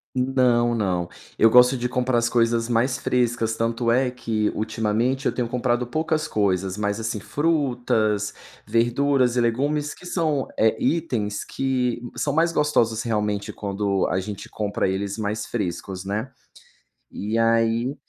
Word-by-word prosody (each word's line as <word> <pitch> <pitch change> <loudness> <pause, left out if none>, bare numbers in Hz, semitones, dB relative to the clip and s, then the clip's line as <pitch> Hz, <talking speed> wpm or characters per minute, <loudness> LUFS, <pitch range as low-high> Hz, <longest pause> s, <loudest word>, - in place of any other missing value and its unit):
Não, 125 -2 +2
não, 90 -6 0 0.3
eu 115 - +6
gosto 125 +2 +6
de 125 0 -1
comprar 125 0 0
as 115 - +2
coisas 115 -1 +2
mais 125 +3 +1
frescas, 120 -4 0
tanto 115 +1 0
é 125 +2 +2
que 110 -4 -1
ultimamente 110 +4 0
eu - - +2
tenho 125 -2 -2
comprado 120 0 0
poucas 155 +4 -1
coisas, 95 -2 0
mas 105 +1 -2
assim 110 -1 -3
frutas, 120 -8 0 0.3
verduras 120 +3 +2
e 125 - +2
legumes 145 +6 0
que 180 - -15
são, 155 -6 0
eh, 110 0 +3
itens 120 -11 -1
que 125 -3 -1
são 145 - -1
mais 165 +3 +3
gostosos 120 -8 +1
realmente 105 -3 -1
quando 100 -1 -1
a 95 - 0
gente 100 +1 -7
compra 105 -2 -1
eles 100 +2 -2
mais 105 0 -2
frescos 95 -3 -4
né, 105 +7 -3 0.8
e 105 +3 -3
aí 115 +3 +2
115 Hz, 145 wpm, -23 LUFS, 105-130 Hz, 0.8 s, eu